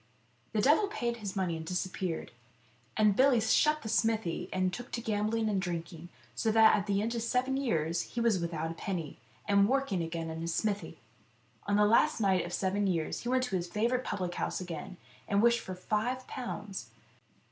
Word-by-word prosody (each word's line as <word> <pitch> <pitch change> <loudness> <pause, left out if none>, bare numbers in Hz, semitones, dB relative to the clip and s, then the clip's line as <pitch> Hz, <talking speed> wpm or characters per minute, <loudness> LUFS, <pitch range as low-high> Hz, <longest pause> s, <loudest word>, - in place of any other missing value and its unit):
The 215 - +2
devil 310 - +5
paid 240 - -2
his 205 -3 -5
money 185 -4 0
and 160 - -5
disappeared, 180 0 -3 0.7
and 210 -2 +4
Billy 260 -1 +5
shut 300 +7 +3
the - - -5
smithy 215 -6 0
and 185 -1 0
took 245 0 -6
to - - -1
gambling 220 0 0
and 200 -3 +1
drink 170 -2 -4
ing, 170 +1 -10 0.2
so 225 - 0
that 220 0 +7
at 200 0 -2
the 200 0 +1
end 230 +2 -1
of 235 - -2
seven 250 +3 0
years 170 - 0
he 240 - -6
was 230 -5 +3
without 165 -1 -3
a - - -5
penny, 170 - -5 0.3
and 200 0 +4
working 270 -9 +1
again 165 0 -4
in 160 0 -5
his 165 0 -2
smithy. 205 -2 -2 0.7
On 205 - +2
the 210 0 +5
last 235 +8 +4
night 190 -4 +2
of 175 - -6
the - - -1
seven 200 +1 0
years 165 -4 -1
he 240 - -4
went 255 0 +2
to 250 -7 -2
his 175 -1 -2
favourite 235 +7 0
public 180 -6 -3
house - - -2
again, 180 0 -6 0.3
and 200 - +2
wished 235 +2 +4
for 185 - -7
five 220 +7 -2
pounds. 205 - -6
205 Hz, 200 wpm, -31 LUFS, 180-235 Hz, 0.7 s, that